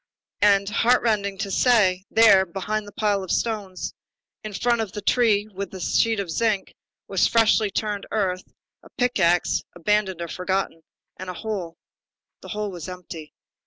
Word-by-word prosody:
And, 200 -1 +4
heartrending 210 -3 +1
to 200 0 -4
say, 190 -5 +3
there, 220 -4 +6
behind 205 +3 -4
the - - -10
pile 205 -1 0
of 185 - -9
stones, 205 -5 -2 0.5
in 215 - -6
front 235 +5 +1
of 215 -4 -5
the 210 - -5
tree 215 -4 +2
with 200 +1 -5
the 190 - -9
sheet 225 +4 +1
of 190 -4 -3
zinc, 215 0 0 0.3
was 195 -2 +2
freshly 225 -2 +3
turned 205 0 -3
earth, 185 -4 -2 0.3
a - - -17
pick 245 -3 +1
axe, 175 -1 +2
abandoned 190 +1 0
or 170 - -3
forgotten, 180 -1 -2 0.4
and 185 0 -7
a 180 - -5
hole. 190 -7 -5 0.7
The - - -11
hole 210 -1 -3
was 175 -2 -7
empty. 175 -4 -9
200 Hz, 160 wpm, -24 LUFS, 185-215 Hz, 0.7 s, there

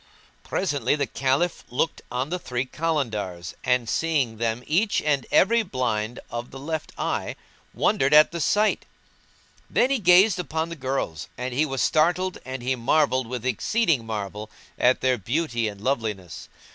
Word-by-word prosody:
Presently 145 -8 0
the 145 -2 0
Caliph 135 +8 0
looked 130 +6 -1
on 125 +3 -2
the 180 +2 -2
three 125 -5 -3
Kalandars 110 - -2
and, 125 -2 +1
seeing 140 -5 0
them 115 +1 -1
each 200 +7 +2
and 145 -3 0
every 230 +4 +4
blind 125 - -2
of 120 +1 -5
the 135 - -10
left 155 +3 -4
eye, - - -2 0.4
wondered 135 +1 +1
at 150 0 +7
the 170 0 -4
sight; 210 +6 +2 0.8
then 255 - +2
he 275 - +2
gazed 185 0 +5
upon 160 -1 -2
the 170 - -6
girls 130 - -3
and 125 0 -4
he 150 +5 +1
was 135 -2 -1
startled 180 +4 +2
and 130 -1 -6
he 130 +1 0
marvelled 130 0 +2
with 125 0 -5
exceeding 155 - +1
marvel 105 -1 -5 0.3
at 125 +1 +3
their 130 -2 +2
beauty 120 - -1
and 100 -1 -7
loveliness. 110 - -3
130 Hz, 160 wpm, -25 LUFS, 120-160 Hz, 0.8 s, at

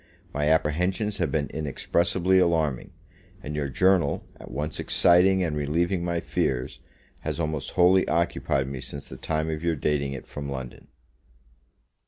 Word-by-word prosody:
My 75 +2 +1
apprehensions 90 +7 +1
have 85 -6 0
been 75 -2 0
inexpressibly 85 +5 +1
alarming; 80 -7 +1 0.5
and 75 - -5
your 75 -2 -2
journal, 95 +5 +2
at - - -11
once 75 +4 -4
exciting 95 +2 +4
and 80 -3 -1
relieving 85 +5 0
my 85 -1 -1
fears, 60 -5 -2 0.4
has - - -4
almost 80 -3 -3
wholly 90 +1 +4
occupied 75 -5 0
me 65 -1 -5
since 70 +2 -4
the - - -9
time 80 0 -2
of 80 +1 -4
your 85 -1 +1
dating 70 -1 -1
it 65 - -7
from 70 -1 -6
London. 65 -3 -7
80 Hz, 150 wpm, -26 LUFS, 70-90 Hz, 0.5 s, exciting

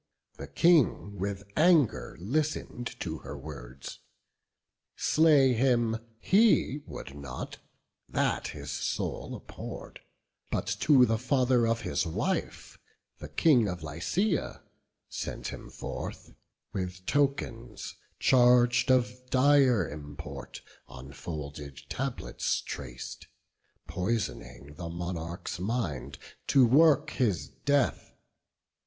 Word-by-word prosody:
The 70 - -7
King 110 - +3
with 100 +1 -3
anger 160 -6 +3
listen'd 125 - -2
to - - -3
her 70 - -8
words; 65 -3 -9 1.0
Slay 150 -5 +4
him 120 -2 +2 0.2
he 195 - +3
would 70 - -8
not; 70 -3 -7 0.5
that - - 0
his 70 0 -7
soul - - -3
abhorr'd; - - -9 0.5
But - - -1
to 135 -5 +6
the 110 -1 0
father 125 -2 +2
of 115 0 0
his - - -1
wife, 80 - -3 0.4
the 75 - -8
King 120 - +4
Of 90 -3 -4
Lycia, 155 - -1 0.4
sent - - -5
him - - -8
forth, - - -7 0.4
with 90 -1 -4
tokens 125 -5 -1 0.3
charg'd 125 0 +5
Of 125 0 +1
dire 130 - +4
import, 75 -1 -8 0.2
on 65 +2 -11
folded 75 -3 -7
tablets - - -2
trac'd, 60 -3 -7 0.6
Pois'ning 75 - -3
the 85 0 -5
monarch's 85 0 -5
mind, 95 - -2 0.3
to 135 -3 +6
work 145 +4 +5
his 90 - 0
death. 140 - 0
115 Hz, 100 wpm, -29 LUFS, -, 1.0 s, to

